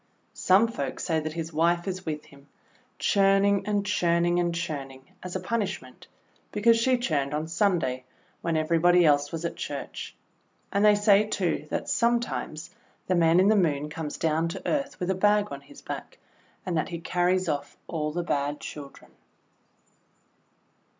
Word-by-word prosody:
Some 195 +5 +4
folk 140 - -4
say 160 -2 0
that 155 0 -4
his 165 0 -5
wife 170 +3 +1
is 185 -2 -4
with 150 -1 -4
him, 140 0 -18 0.5
churning 195 0 +3
and 205 -1 0
churning 175 -3 +2
and 175 -1 0
churning, 140 -6 -5 0.2
as 180 0 -7
a - - 0
punishment, 190 - -4 0.4
because 230 +2 +4
she 255 +2 +3
churned 150 - -1
on 155 +1 -2
Sunday 165 -8 0 0.4
when 165 -2 0
everybody 170 +2 +4
else 145 -1 +3
was 165 0 -4
at - - -3
Church. - - -6 0.6
And 200 +1 +2
they 210 -1 +6
say, 205 0 +4
too, 180 -7 -1
that - - -3
sometimes 240 +1 -1 0.3
the - - 0
Man 170 0 +4
in 190 +2 +5
the 215 - +5
Moon 150 -6 +1
comes 155 -1 -5
down 160 +1 +1
to 165 - -6
earth 280 -1 -1
with 180 +1 -1
a - - +2
bag 205 +2 +2
on 140 0 -6
his 140 - -16
back, - - -7 0.5
and 180 - -2
that 155 - 0
he 170 - -4
carries 180 +2 0
off 145 -3 -3
all 150 -3 -2
the 175 +3 -2
bad 145 -2 -1
children. 145 -2 -10
170 Hz, 165 wpm, -27 LUFS, 155-195 Hz, 0.6 s, they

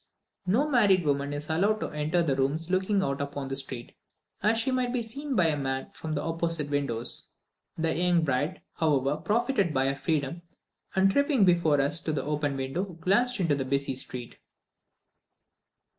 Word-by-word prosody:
No 240 +11 +3
married 205 - +4
woman 140 0 0
is 145 +1 -4
allowed 200 +7 +1
to - - -2
enter 155 +3 0
the 140 -5 +1
rooms 150 +6 -1
looking 190 +1 +2
out 140 -2 -1
upon 140 -1 -4
the 135 - -2
street, 130 -3 -4 0.5
as 215 +3 +3
she 260 +4 +1
might 255 -1 0
be 245 -2 -1
seen 275 +5 -4
by 185 - +4
a 160 -2 +2
man 135 -2 -3
from 155 -1 -5
the - - -2
opposite 165 -2 -1
windows. 125 -5 -1 0.5
The 165 0 0
young 175 -1 +2
bride, 145 +5 -1
however, 145 -2 +1
profited 205 - 0
by 130 0 +2
her 135 - -1
freedom, 150 +2 -2 0.5
and 190 +1 +4
tripping 280 -4 +3
before 170 -5 +3
us 145 +4 +2
to 160 -1 -2
the 150 - -1
open 145 -1 -1
window, 135 +7 -2
glanced 200 +7 +1
into 165 -5 +2
the 140 -1 0
busy 140 +1 -1
street. 125 -2 -6
160 Hz, 175 wpm, -28 LUFS, 140-195 Hz, 0.5 s, married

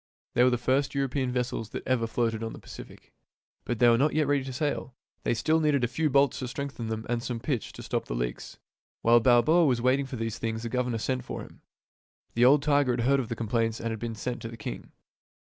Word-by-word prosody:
They 120 - +4
were 130 - +6
the 125 - +1
first 130 +4 0
European 135 -1 0
vessels 125 -3 -2
that - - -6
ever 120 -3 +1
floated 115 -1 -1
on 115 0 -4
the - - -9
Pacific. - - -12 0.5
But 120 - -2
they 120 - +5
were 115 0 +5
not 150 +3 +2
yet 155 -1 +3
ready 140 -1 +1
to 135 - -5
sail. 130 -2 -2 0.3
They - - 0
still 160 +7 +2
needed 150 -4 +2
a - - +3
few 155 +6 0
bolts 140 -1 +3
to 130 - -3
strengthen 135 -2 -5
them 110 0 -4
and 120 0 -1
some 120 -1 -4
pitch 120 -2 -2
to - - -9
stop - - -2
the - - -4
leaks. - - -4 0.5
While 120 +1 +6
Balboa 130 +8 +5
was 125 -5 +2
waiting 130 +3 +2
for 130 - -6
these 115 -2 -3
things 115 0 -3
the 115 - -3
governor 125 -1 -1
sent 130 +3 -2
for - - -6
him. - - -15 0.7
The 120 +1 +4
old 140 +2 +6
tiger 145 -4 +3
had 120 - -1
heard 135 +3 +3
of 125 - -3
the 115 - -2
complaints 115 0 0
that 115 - -3
had 110 - -4
been 115 0 -4
sent 120 +3 -4
to - - -5
the 115 0 -9
king. 105 - -7
125 Hz, 240 wpm, -28 LUFS, 115-140 Hz, 0.7 s, were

